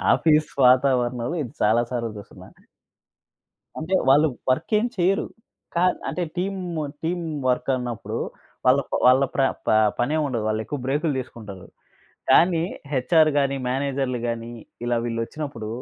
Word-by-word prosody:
Office 155 -1 +2 0.2
వాతావరణంలో 125 -2 +3 0.2
ఇది 120 - -9
చాలా 110 +3 +3
సార్లు 120 -2 -2
చుసున్నా. 100 - -12 1.3
అంటే 165 +5 -1
వాళ్ళు 145 +4 +6 0.2
వర్కేం 210 - +1
చెయ్యరు. 185 +2 +2 0.5
కా 170 - +2 0.3
అంటే 180 - -2
టీమ్ 195 +1 -2 0.4
టీమ్ 175 +1 -1 0.2
వర్క్ 125 +1 0
అన్నప్పుడు 120 -3 -4 0.5
వాళ్ళ 130 +2 +5
ప - - -7
వాళ్ళ 130 +2 +6
ప్ర - - +2 0.3
ప - - +2 0.3
పనేముండదు. 135 -3 0
వాళ్ళెక్కువ 110 +6 -2
బ్రేకు‌లు 145 +3 0
తీసుకుంటారు. 105 -7 -9 0.6
కానీ 170 -1 +5 0.3
హెచ్‌ఆర్ 155 +5 +4
గాని, 140 -1 +2
మేనేజర్‌లు 135 -1 -1
గాని, 115 0 -4 0.3
ఇలా 120 0 +1
వీళ్ళొచ్చినప్పుడు 115 0 -4
130 Hz, 120 wpm, -23 LUFS, 120-155 Hz, 1.3 s, వాళ్ళు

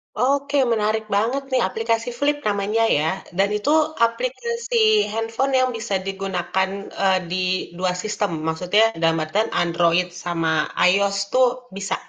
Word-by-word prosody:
Oke, 280 +4 +1 0.2
menarik 220 0 0
banget 240 +7 0
nih, 260 - +2
aplikasi 225 +3 -1
Flip 290 +2 +1
namanya 205 +2 0
ya, 155 - 0 0.3
dan 200 +1 +3
itu 210 +7 -2 0.4
aplikasi 470 - -3 0.4
handphone 225 +4 -1
yang 255 - +2
bisa 205 -3 -3
digunakan, 190 -1 -2 0.3
eee, 190 -1 +3
di 185 - -1 0.4
dua 185 0 0
sistem, 210 -2 -2 0.2
maksudnya 180 +6 +1 0.2
dalam 165 0 +3
artian 205 +8 -1
Android 170 +1 +2 0.2
sama 165 -2 -1 0.4
iOS 200 +1 +2 0.2
tuh 255 0 +5 0.3
bisa? 195 0 -2
210 Hz, 135 wpm, -22 LUFS, 185-245 Hz, 0.4 s, tuh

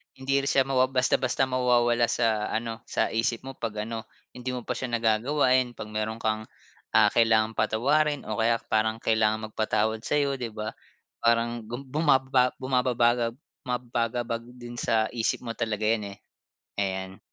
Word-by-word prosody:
hindi 135 +1 0
rin 140 - -3
siya 135 -1 +4
ma 135 -1 0
basta 130 -1 +2
basta 130 +1 +1
mawawala 120 -2 +2
sa 110 -3 +1
ano, 115 0 -3
sa - - 0
isip 115 +1 0
mo 135 - -6
pag 105 -2 -3
ano, 110 0 -6 0.2
hindi 125 +1 -5
mo 125 - -5
pa - - -5
siya 130 - -2
nagagawa. 115 +5 +2 0.2
Pag 105 - -7
meron 110 +1 -2
kang, 110 -1 -2 0.5
ah, 105 -2 +6
kailangang 110 -1 +3
patawarin 145 +7 +1
o 110 - -4
kaya 115 +1 +3 0.2
parang 110 0 +2
kailangan 110 -1 0
magpatawad 110 0 0
sayo, 140 +2 0
di 120 - -2
ba? 110 -1 -5 0.5
Parang 115 -1 +1
buma 120 +4 -6 0.4
bumababa 130 -1 +3
bumabagab 120 -2 +1 0.3
bumababagabag 120 -1 -2
din 120 -1 -8
sa 110 -1 +1
isip 115 +1 -1
mo 115 - -4
talaga 110 -2 -3
yan 105 -2 0
eh. - - -27 0.6
Ayan. 95 -1 -2
115 Hz, 160 wpm, -27 LUFS, 110-125 Hz, 0.6 s, ah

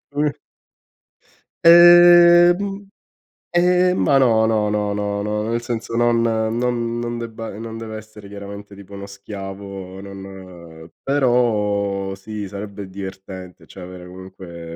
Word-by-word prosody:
Una 150 0 +1 1.3
Ehm, 175 0 +8
m 200 0 -6 0.6
ehm, 180 +1 +2
ma 140 -2 +3
no, 115 -4 +3
no, 110 -2 +1
no, 105 -1 -1
no, 100 0 -3
no, 105 0 -2
nel 115 0 -1
senso 120 -1 -5
non 120 0 +2
non 115 +1 -1
non 120 0 -4
debba 115 -2 -7
non 115 0 -7
deve 110 -1 -7
essere 110 -1 -13
chiaramente 100 0 -10
tipo 100 0 -14
uno 100 0 -8
schiavo 100 -1 -9
non 95 -4 -12
però 105 -7 0
sì 105 +1 -7
sarebbe 100 0 -8
divertente 95 -1 -10
cioè 95 - -13
avere 90 0 -10
comunque 90 -2 -11
105 Hz, 125 wpm, -20 LUFS, 95-120 Hz, 1.3 s, Ehm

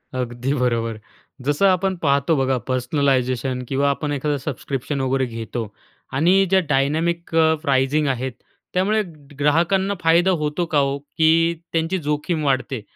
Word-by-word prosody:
अगदी 125 +1 -2
बरोबर. 115 -4 0 0.5
जसं 145 +7 +2
आपण 190 0 +2
पाहतो 140 +2 +2
बघा 135 -1 +1
पर्सनलायझेशन 130 -1 0
किंवा 140 +1 +1
आपण 145 +1 -2
एखादा 145 +1 -1
सबस्क्रिप्शन 135 0 -4
वगैरे 130 0 +1
घेतो 115 -1 -5 0.5
आणि 185 +6 +4
ज्या 190 0 +5
डायनॅमिक 160 +5 0
अ, 160 -1 +5
प्राइजिंग 140 0 +1
आहेत. 130 0 -1 0.4
त्यामुळे 205 +4 +2 0.4
ग्राहकांना 170 +7 +2
फायदा 170 +3 +4
होतो 150 +4 -1
का 150 - +3
ओ, 140 0 0
की 160 +3 +2 0.2
त्यांची 165 +3 0
जोखीम 150 +2 -1
वाढते? 130 -3 0
145 Hz, 135 wpm, -21 LUFS, 130-165 Hz, 0.5 s, ज्या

